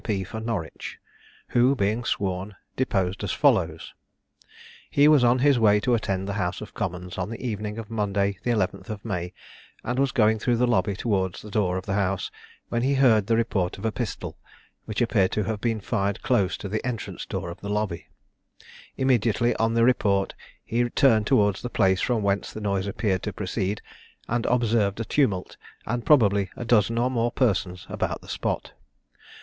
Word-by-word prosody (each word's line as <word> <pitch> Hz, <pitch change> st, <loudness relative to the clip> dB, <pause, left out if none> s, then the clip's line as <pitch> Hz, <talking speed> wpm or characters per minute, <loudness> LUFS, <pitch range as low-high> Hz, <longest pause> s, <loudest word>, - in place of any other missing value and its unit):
P. 100 Hz, -4 st, -1 dB
for 110 Hz, +4 st, -6 dB
Norwich), 110 Hz, -8 st, -4 dB, 0.5 s
who, 125 Hz, +3 st, +4 dB
being 110 Hz, +1 st, 0 dB
sworn, 95 Hz, -2 st, -2 dB, 0.2 s
deposed 95 Hz, -7 st, -1 dB
as -, -, -1 dB
follows: -, -, +1 dB, 1.0 s
He 145 Hz, +1 st, +5 dB
was 150 Hz, -4 st, +6 dB
on 120 Hz, +1 st, +5 dB
his 135 Hz, 0 st, +4 dB
way 105 Hz, -2 st, +5 dB
to 125 Hz, -, +1 dB
attend 95 Hz, -4 st, -1 dB
the 100 Hz, -, -2 dB
House 90 Hz, -1 st, -2 dB
of 105 Hz, -, -9 dB
Commons 90 Hz, -3 st, -4 dB
on 90 Hz, +2 st, -2 dB
the 115 Hz, -, -6 dB
evening 105 Hz, -3 st, -4 dB
of 115 Hz, -1 st, -7 dB
Monday, 100 Hz, -3 st, 0 dB
the 120 Hz, -, -3 dB
11th 105 Hz, -1 st, -1 dB
of 105 Hz, -1 st, -6 dB
May, 90 Hz, -5 st, -3 dB, 0.5 s
and 125 Hz, +2 st, -2 dB
was 135 Hz, -1 st, +2 dB
going 110 Hz, -4 st, +3 dB
through 120 Hz, +2 st, +1 dB
the 125 Hz, -, +3 dB
lobby 100 Hz, -4 st, +1 dB
towards 95 Hz, -4 st, -1 dB
the 105 Hz, -, -10 dB
door 95 Hz, -3 st, +1 dB
of 95 Hz, -, -5 dB
the 95 Hz, -, -2 dB
house, 100 Hz, -1 st, -1 dB, 0.4 s
when 120 Hz, -, 0 dB
he 135 Hz, +3 st, +2 dB
heard 115 Hz, -7 st, +4 dB
the 115 Hz, -, +3 dB
report 100 Hz, -6 st, 0 dB
of -, -, -7 dB
a 110 Hz, -, +1 dB
pistol, 120 Hz, -1 st, -5 dB, 0.5 s
which 110 Hz, +3 st, -1 dB
appeared 100 Hz, -5 st, +2 dB
to 105 Hz, -, +1 dB
have 105 Hz, +1 st, -3 dB
been 115 Hz, -2 st, 0 dB
fired 100 Hz, -1 st, -2 dB
close 100 Hz, -7 st, +1 dB
to -, -, -6 dB
the 110 Hz, +3 st, -3 dB
entrance 125 Hz, -4 st, -4 dB
door 85 Hz, -, -4 dB
of 85 Hz, -, -11 dB
the 100 Hz, -, -5 dB
lobby. 105 Hz, -5 st, -2 dB, 0.9 s
Immediately 120 Hz, -2 st, +2 dB
on 115 Hz, +1 st, +1 dB
the 115 Hz, -, +4 dB
report, 100 Hz, -5 st, +2 dB, 0.3 s
he 120 Hz, +1 st, 0 dB
turned 110 Hz, -5 st, +3 dB
towards 105 Hz, -7 st, +3 dB
the 120 Hz, -, -4 dB
place 95 Hz, -4 st, +2 dB
from 115 Hz, -4 st, 0 dB
whence 100 Hz, 0 st, 0 dB
the -, -, -7 dB
noise 100 Hz, -2 st, -1 dB
appeared 95 Hz, -2 st, -1 dB
to 105 Hz, -, -4 dB
proceed, 100 Hz, +1 st, -3 dB, 0.4 s
and 120 Hz, 0 st, -1 dB
observed 115 Hz, -4 st, +1 dB
a 115 Hz, -, -2 dB
tumult, 105 Hz, -11 st, 0 dB, 0.3 s
and 120 Hz, +1 st, -3 dB
probably 100 Hz, -, +4 dB
a 120 Hz, -, -6 dB
dozen 115 Hz, -1 st, +3 dB
or 125 Hz, +2 st, +1 dB
more 120 Hz, -1 st, 0 dB
persons 95 Hz, -8 st, 0 dB
about -, -, -3 dB
the -, -, -15 dB
spot. -, -, -3 dB
105 Hz, 190 wpm, -25 LUFS, 100-120 Hz, 1.0 s, was